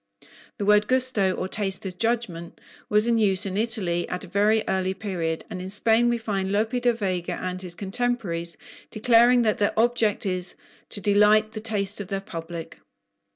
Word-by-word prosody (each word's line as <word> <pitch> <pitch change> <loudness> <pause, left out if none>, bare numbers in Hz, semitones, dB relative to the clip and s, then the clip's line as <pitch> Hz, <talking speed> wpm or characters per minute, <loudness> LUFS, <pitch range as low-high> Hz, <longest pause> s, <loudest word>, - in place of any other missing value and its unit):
The 200 - -3
word 210 0 +4
"gusto," 255 -7 +2
or 185 - -3
taste 195 -1 -2
as 190 - -3
judgment, 205 -5 -2 0.3
was 210 +1 +3
in 235 -1 +2
use 195 -2 +2
in 190 -1 -4
Italy 200 -6 +1
at 180 - -4
a - - -9
very 210 +4 +2
early 190 0 -1
period; 175 -5 -3
and 180 - -7
in 185 - -6
Spain 225 +4 +3
we 240 - +1
find 195 -4 -3
Lope 215 +3 0
di 245 - +3
Vega 185 -6 -2
and 185 +1 -5
his 180 -2 -4
contemporaries 195 -6 -3 0.3
declaring 240 +2 +4
that 215 -2 0
their 205 +1 0
object 230 -3 +1
is 185 -2 -3 0.3
to 205 - -1
"delight 210 +2 +4
the 215 - -7
taste" 205 -2 -2
of 200 - -7
their 195 0 -2
public. 165 -3 -8
205 Hz, 180 wpm, -24 LUFS, 185-225 Hz, 0.3 s, word